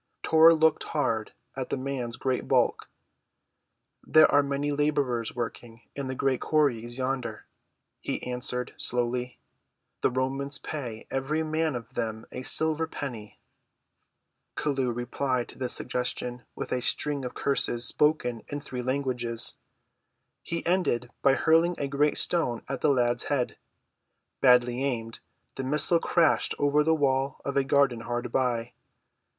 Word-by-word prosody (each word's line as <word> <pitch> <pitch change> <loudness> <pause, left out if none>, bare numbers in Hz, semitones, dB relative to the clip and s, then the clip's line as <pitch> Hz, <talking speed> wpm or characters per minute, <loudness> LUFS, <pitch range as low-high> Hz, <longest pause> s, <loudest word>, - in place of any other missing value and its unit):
Tor 160 +1 +7
looked 160 0 +3
hard 115 -6 0 0.2
at 130 -1 -4
the - - -1
man's 130 -3 -4
great 130 -1 -2
bulk. - - +1 1.1
"There 155 0 +6
are 145 - +6
many 140 +1 -1
laborers 140 -6 0
working 115 -1 -6
in 140 -2 -4
the 130 - -3
great 130 -1 0
quarries 120 -6 +1
yonder," 130 -4 -3 0.5
he - - -4
answered 125 0 -2
slowly. 125 +1 0 0.6
"The - - +3
Romans 135 +3 -1
pay 120 -8 -6
every 140 +4 -1
man 155 -2 0
of 120 +1 -7
them 110 -2 -3
a - - -6
silver 160 +4 +1
penny." 120 -9 -7 1.2
Chelluh 135 -4 0
replied 120 +1 -2
to - - -14
this 125 -2 -2
suggestion 125 -1 -3
with - - -6
a 125 - 0
string 145 +2 0
of 125 - -6
curses 120 -3 +1
spoken 125 -4 +1
in 145 - -4
three 130 -3 -6
languages. 125 -3 -1 0.9
He 170 0 -4
ended 170 -9 0
by 135 -1 +4
hurling 165 +4 +3
a 140 - -2
great 145 +2 +1
stone 155 -9 +1
at 135 - -4
the - - +3
lad's 120 -3 +1
head. 135 -4 -1 0.9
Badly 125 0 +4
aimed, 115 -4 -3 0.4
the 135 - -3
missile 150 +5 +3
crashed 165 -2 +2
over 145 +1 +3
the 160 +1 +3
wall 135 -2 0
of 140 - -3
a 140 - +3
garden 135 -3 +2
hard 120 +1 -4
by. 120 -2 0
130 Hz, 140 wpm, -27 LUFS, 120-145 Hz, 1.2 s, Tor